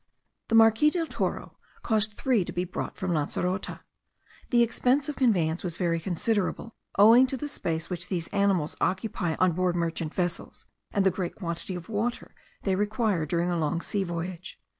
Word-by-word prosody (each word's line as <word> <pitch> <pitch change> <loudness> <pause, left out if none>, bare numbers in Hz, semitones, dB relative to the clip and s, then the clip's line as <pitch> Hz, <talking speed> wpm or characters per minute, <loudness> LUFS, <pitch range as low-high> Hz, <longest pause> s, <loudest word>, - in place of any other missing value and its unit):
The 225 - +1
Marquis 225 +6 +6
del 335 +1 -1
Toro - - -3 0.3
caused 215 -2 +1
three 245 -7 +2
to - - -5
be 175 - -1
brought 180 - -5
from 185 -1 -2
Lancerote. 180 +5 -2 0.7
The 240 -1 +5
expense 255 +5 +1
of 295 - -3
conveyance 175 -10 +2
was 170 -3 -4
very 170 -2 0
considerable, 200 +5 -1 0.2
owing 230 +6 +7
to 265 - -2
the 295 - -4
space 165 - -3
which 180 0 -5
these 170 -4 -2
animals 195 -6 +1
occupy 185 -3 -1
on 185 -1 +3
board 180 +1 0
merchant 165 -2 -2
vessels, 175 -2 -3 0.3
and 200 -2 +1
the 190 - +5
great 180 -1 -4
quantity 170 0 -4
of 175 0 -7
water 225 +2 -2 0.3
they 195 - +1
require 205 -4 0
during 170 +2 0
a 170 - 0
long 160 +2 0
sea 200 +3 -2
voyage. 175 0 -5
185 Hz, 175 wpm, -27 LUFS, 170-220 Hz, 0.7 s, owing